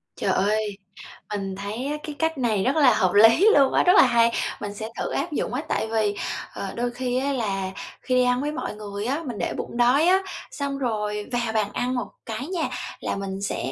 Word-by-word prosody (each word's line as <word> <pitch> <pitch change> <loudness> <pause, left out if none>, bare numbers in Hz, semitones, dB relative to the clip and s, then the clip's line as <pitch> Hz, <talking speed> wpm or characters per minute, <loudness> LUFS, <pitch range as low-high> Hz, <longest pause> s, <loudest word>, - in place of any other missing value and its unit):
Trời - - 0
ơi, 210 0 0 0.6
mình 195 -2 -3
thấy 200 +1 -5
á 300 - -2
cái 300 - -6
cách 320 -2 0
này 220 -6 +1
rất 265 - +1
là 280 -6 +6
hợp 185 -4 +2
lý 225 - +7
luôn 275 -2 +5
á, - - +4
rất 360 - +5
là - - +9
hay, 235 -2 +4 0.3
mình 205 -1 -4
sẽ 220 +2 -6
thử - - -2
áp 345 - -2
dụng 285 - -2
á. 255 - -1
Tại 220 - -1
vì, 215 -2 +1 0.4
ờ, 195 -1 -5
đôi 240 +1 -1
khi 250 0 -2
á 275 +2 0
là 195 -6 -2 0.3
khi 255 - 0
đi 255 - +5
ăn 250 0 +2
với 295 +1 -1
mọi 300 -8 -4
người 205 -1 -6
á 280 +7 -1
mình 240 -6 -5
để - - -2
bụng - - -6
đói 255 +7 +4
á, 375 +1 +5 0.3
xong 280 -1 -3
rồi 210 -5 -2
vào 240 -2 -1
bàn 215 -2 +1
ăn 250 +1 -1
một 245 -5 -2 0.2
cái 225 +5 -5
nha 350 -3 -2 0.3
là - - -2
mình 195 -1 -5
sẽ 135 -9 -2
235 Hz, 230 wpm, -24 LUFS, 210-270 Hz, 0.6 s, là